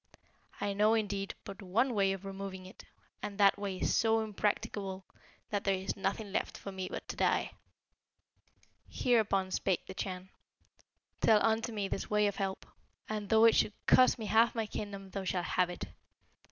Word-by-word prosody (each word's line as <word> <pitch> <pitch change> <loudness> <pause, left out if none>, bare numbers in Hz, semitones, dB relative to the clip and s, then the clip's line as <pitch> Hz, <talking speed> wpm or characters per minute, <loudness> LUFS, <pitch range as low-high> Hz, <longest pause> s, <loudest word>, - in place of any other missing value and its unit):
I 200 - -1
know, 210 +3 +4
indeed, 200 -3 -2
but 195 - -9
one 225 +7 +1
way 195 -2 +2
of 195 0 -5
removing 195 -1 -6
it; 185 - -13 0.4
and 205 -1 -5
that 200 -1 +5
way 200 -2 -3
is - - 0
so 225 0 +3
impracticable, 205 -2 -2 0.5
that 205 -1 -1
there 195 -1 +2
is 190 +1 -3
nothing 200 +1 -2
left - - -2
for 200 - -7
me 190 -1 -4
but - - -6
to - - -4
die.' - - +1 1.4
Hereupon 200 -6 +1
spake 185 -1 0
the - - -8
Chan, 185 -1 -5 0.9
'Tell 215 -1 +5
unto 225 +1 +1
me 205 -3 -2
this 195 - -4
way 210 0 +3
of 200 -1 -1
help, 195 -1 -3 0.4
and 210 -2 -4
though 220 0 +6
it 230 - +7
should 205 - +2
cost 255 0 +6
me 225 - -5
half 225 +3 +4
my 225 -1 0
kingdom 200 -2 -6
thou 195 0 -4
shalt 180 -1 -1
have 180 -1 +1
it. 175 - -6
200 Hz, 180 wpm, -32 LUFS, 190-215 Hz, 1.4 s, it